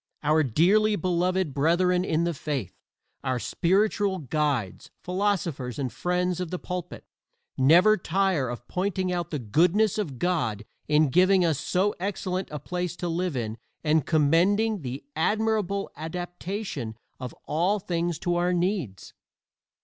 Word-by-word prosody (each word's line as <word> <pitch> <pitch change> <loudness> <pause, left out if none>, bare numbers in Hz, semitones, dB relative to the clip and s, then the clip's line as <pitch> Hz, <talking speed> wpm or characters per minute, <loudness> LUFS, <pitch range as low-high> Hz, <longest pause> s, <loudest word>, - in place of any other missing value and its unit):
Our 155 +1 +4
dearly 190 - +3
beloved 180 -3 0
brethren 180 +5 +2
in 160 -2 0
the 170 0 0
faith, 140 - -4 0.5
our 130 -2 0
spiritual 195 - +1
guides, 145 - -2
philosophers 180 - -1
and 130 -4 -3
friends 180 0 -1
of 180 -2 -3
the 180 - -3
pulpit, 180 -1 -6 0.5
never 175 +11 +5
tire 180 -7 0
of 120 0 -7
pointing 185 0 -1
out 175 -2 -2
the 150 - -2
goodness 180 - +2
of 150 -11 -3
God 125 - -1 0.2
in 150 0 +4
giving 185 +4 +4
us 160 -4 +1
so 190 +6 +1
excellent 185 -1 -3
a 150 - -5
place 180 +4 -4
to 175 0 -4
live 170 -3 -1
in 110 -1 -4 0.2
and 155 -2 +2
commending 180 +8 +3
the 130 0 -5
admirable 210 +2 0
adaptation 175 - -5 0.2
of 125 -2 -6
all 180 +7 +1
things 175 -3 -2
to 175 -1 0
our 175 +1 +1
needs. 175 - -2
175 Hz, 140 wpm, -26 LUFS, 150-185 Hz, 0.5 s, never